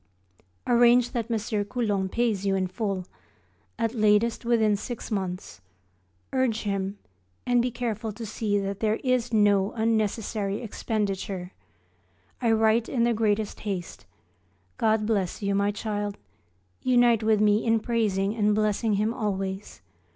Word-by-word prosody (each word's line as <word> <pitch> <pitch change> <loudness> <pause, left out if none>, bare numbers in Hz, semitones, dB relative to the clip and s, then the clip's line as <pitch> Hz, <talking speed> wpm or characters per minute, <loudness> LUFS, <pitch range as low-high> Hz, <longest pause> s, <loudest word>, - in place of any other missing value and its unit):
Arrange 240 0 +5
that 235 -3 -3
M. 215 -2 -1
Coulon 205 -4 -1
pays 225 -3 0
you 195 -1 +1
in 190 -1 +1
full, 190 -1 -3 0.7
at 230 -1 -1
latest 215 +1 +2
within 225 -3 +3
six 235 +3 -6
months; 185 - -4 0.7
urge 255 -4 +1
him, 195 -1 -2 0.5
and 245 -1 +3
be 250 - 0
careful 225 -3 -3
to 225 +2 -7
see 210 -1 -1
that 195 0 -3
there 215 -1 +1
is 250 -2 +1
no 205 -2 +3
unnecessary 215 -2 -1
expenditure. 200 -4 -3 0.9
I 230 - +2
write 225 +1 +3
in 240 -4 +1
the 235 0 +3
greatest 215 -1 0
haste. 195 -5 -5 0.7
God 220 -1 +2
bless 205 -3 -1
you, 200 0 +1
my 200 +1 +2
child. 205 -1 -3 0.6
Unite 240 -3 +4
with 220 -1 +3
me 210 0 +3
in 225 -1 +3
praising 215 -3 0
and 210 -2 +2
blessing 215 +1 +1
Him 215 +3 0
always. 195 - -4
215 Hz, 135 wpm, -26 LUFS, 200-230 Hz, 0.9 s, Arrange